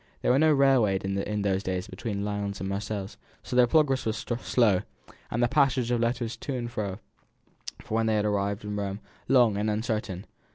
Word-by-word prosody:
There -, -, +3 dB
was 130 Hz, -, +4 dB
no 155 Hz, +1 st, +5 dB
railroad 130 Hz, -10 st, +3 dB
in 100 Hz, +2 st, -2 dB
those 95 Hz, -1 st, +1 dB
days 95 Hz, 0 st, -3 dB
between 100 Hz, -2 st, -4 dB
Lyons 100 Hz, -1 st, -3 dB
and 95 Hz, -, -3 dB
Marseilles, 100 Hz, +1 st, -4 dB, 0.3 s
so 125 Hz, -, -5 dB
their 125 Hz, -1 st, +6 dB
progress 135 Hz, -1 st, +3 dB
was 110 Hz, -1 st, -1 dB, 0.2 s
slow, 105 Hz, -7 st, +3 dB, 0.5 s
and 120 Hz, +2 st, 0 dB
the -, -, +4 dB
passage 130 Hz, -3 st, +2 dB
of 120 Hz, -, +2 dB
letters 115 Hz, 0 st, -1 dB
to 140 Hz, -, -4 dB
and 120 Hz, -1 st, -4 dB
fro, 100 Hz, -5 st, -3 dB, 0.9 s
when 110 Hz, +1 st, 0 dB
they 110 Hz, -, +2 dB
had 105 Hz, 0 st, +1 dB
arrived 100 Hz, -1 st, -1 dB
in 105 Hz, 0 st, -4 dB
Rome, 100 Hz, 0 st, -3 dB, 0.3 s
long 120 Hz, -6 st, +4 dB
and 105 Hz, +1 st, 0 dB
uncertain. 105 Hz, -3 st, -2 dB
110 Hz, 190 wpm, -27 LUFS, 100-120 Hz, 0.9 s, their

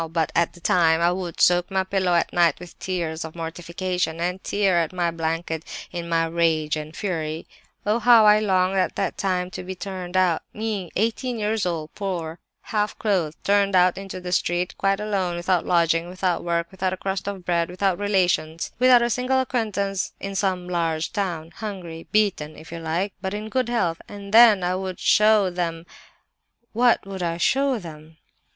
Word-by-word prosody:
_ -, -, -19 dB
But 165 Hz, -2 st, 0 dB
at 170 Hz, 0 st, +1 dB
that 175 Hz, -, -17 dB
time 165 Hz, -2 st, +3 dB
I 170 Hz, +1 st, +3 dB
would 180 Hz, -2 st, -5 dB
soak 175 Hz, 0 st, +4 dB
my 190 Hz, -1 st, +1 dB
pillow 190 Hz, -2 st, +1 dB
at 170 Hz, -, +1 dB
night 175 Hz, -1 st, +3 dB
with 175 Hz, 0 st, -12 dB
tears 170 Hz, -4 st, -3 dB
of 160 Hz, 0 st, -8 dB
mortification, 170 Hz, 0 st, -3 dB
and 180 Hz, +2 st, -2 dB
tear 195 Hz, -4 st, +2 dB
at 165 Hz, -2 st, -1 dB
my 175 Hz, -2 st, 0 dB
blanket 165 Hz, 0 st, -3 dB, 0.3 s
in 170 Hz, -1 st, -5 dB
my 165 Hz, 0 st, +2 dB
rage 160 Hz, -2 st, +1 dB
and 155 Hz, +1 st, -7 dB
fury. 160 Hz, -5 st, -3 dB, 0.4 s
Oh, 215 Hz, +3 st, +2 dB
how 235 Hz, -2 st, +6 dB
I 210 Hz, 0 st, +7 dB
longed 190 Hz, -2 st, +2 dB
at 185 Hz, -, 0 dB
that -, -, -1 dB
time 185 Hz, -2 st, -1 dB
to -, -, -6 dB
be 185 Hz, +1 st, -6 dB
turned 185 Hz, -1 st, -5 dB
out—me, 185 Hz, +2 st, -1 dB
eighteen 230 Hz, +4 st, -1 dB
years 215 Hz, -2 st, 0 dB
old, 160 Hz, -3 st, -4 dB
poor, 175 Hz, -5 st, -4 dB, 0.3 s
half 210 Hz, -1 st, 0 dB
clothed, 180 Hz, -8 st, 0 dB
turned 200 Hz, -1 st, +2 dB
out 180 Hz, 0 st, +5 dB
into 195 Hz, -1 st, -7 dB
the 180 Hz, 0 st, -6 dB
street, 180 Hz, 0 st, 0 dB
quite 195 Hz, 0 st, +1 dB
alone, 195 Hz, -4 st, -1 dB
without 175 Hz, 0 st, 0 dB
lodging, 170 Hz, -1 st, +2 dB
without 185 Hz, -1 st, -1 dB
work, 170 Hz, -1 st, -1 dB
without 185 Hz, -1 st, -2 dB
a -, -, -4 dB
crust 195 Hz, +1 st, -3 dB
of 195 Hz, -3 st, -5 dB
bread, 170 Hz, -1 st, +1 dB
without 185 Hz, 0 st, 0 dB
relations, 180 Hz, -5 st, 0 dB
without 250 Hz, -1 st, +6 dB
a 235 Hz, -, +1 dB
single 255 Hz, +3 st, +1 dB
acquaintance, 210 Hz, -6 st, -1 dB
in 195 Hz, 0 st, -5 dB
some 185 Hz, -2 st, -1 dB
large 165 Hz, -2 st, -1 dB
town—hungry, 175 Hz, -2 st, -5 dB
beaten 195 Hz, -8 st, +1 dB
(if 160 Hz, -, -13 dB
you 170 Hz, -, -6 dB
like), 170 Hz, +5 st, -2 dB
but 190 Hz, +1 st, -3 dB
in 215 Hz, +1 st, -5 dB
good 255 Hz, 0 st, 0 dB
health—and 200 Hz, -1 st, -3 dB
then 225 Hz, -5 st, +7 dB
I 180 Hz, +1 st, +1 dB
would 185 Hz, 0 st, -4 dB
show 210 Hz, -3 st, +4 dB
them— 170 Hz, -2 st, -3 dB, 0.9 s
"What 240 Hz, -1 st, +3 dB
would 195 Hz, -1 st, -6 dB
I 170 Hz, -1 st, -1 dB
show 270 Hz, +8 st, +2 dB
them? 160 Hz, -4 st, -11 dB
180 Hz, 185 wpm, -23 LUFS, 170-200 Hz, 0.9 s, I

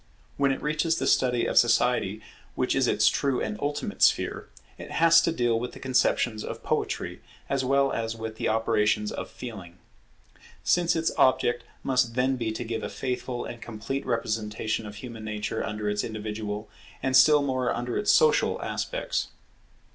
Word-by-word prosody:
When 140 Hz, -1 st, +2 dB
it 135 Hz, -, -3 dB
reaches 155 Hz, +2 st, +1 dB
the -, -, -1 dB
study 125 Hz, -2 st, +2 dB
of -, -, +4 dB
Society, 115 Hz, -3 st, +2 dB, 0.3 s
which -, -, 0 dB
is -, -, +2 dB
its -, -, +3 dB
true 135 Hz, -3 st, +1 dB
and 215 Hz, -, -2 dB
ultimate 145 Hz, +1 st, -3 dB
sphere, -, -, +2 dB, 0.3 s
it -, -, -8 dB
has 165 Hz, 0 st, +5 dB
to 165 Hz, -, +1 dB
deal 120 Hz, -7 st, +1 dB
with 125 Hz, +1 st, -5 dB
the -, -, -10 dB
conceptions 120 Hz, -4 st, +1 dB
of -, -, -7 dB
Poetry, 90 Hz, +4 st, -2 dB, 0.3 s
as 135 Hz, -1 st, +1 dB
well 135 Hz, +1 st, +2 dB
as 115 Hz, 0 st, -2 dB
with 110 Hz, -1 st, -6 dB
the -, -, -1 dB
operations 105 Hz, -1 st, +1 dB
of -, -, -5 dB
Feeling: 95 Hz, -8 st, -9 dB, 0.9 s
since 175 Hz, 0 st, +2 dB
its 165 Hz, 0 st, +1 dB
object 120 Hz, -2 st, +3 dB, 0.2 s
must 125 Hz, -3 st, +1 dB
then 130 Hz, +1 st, +2 dB
be 115 Hz, -3 st, -2 dB
to 110 Hz, -, -4 dB
give 115 Hz, -1 st, -3 dB
a -, -, -4 dB
faithful 125 Hz, -1 st, -4 dB
and 120 Hz, -, -8 dB
complete 120 Hz, +5 st, -4 dB
representation 110 Hz, -1 st, -2 dB
of 105 Hz, -, -9 dB
human 115 Hz, 0 st, -8 dB
nature 105 Hz, -1 st, -3 dB
under 105 Hz, 0 st, -4 dB
its 105 Hz, 0 st, 0 dB
individual, 105 Hz, -1 st, -5 dB, 0.4 s
and 130 Hz, -1 st, +1 dB
still 150 Hz, +1 st, +7 dB
more 130 Hz, -2 st, 0 dB
under 120 Hz, 0 st, -3 dB
its 210 Hz, -, +2 dB
social, 470 Hz, -1 st, +4 dB
aspects. -, -, -2 dB
120 Hz, 170 wpm, -27 LUFS, 110-135 Hz, 0.9 s, still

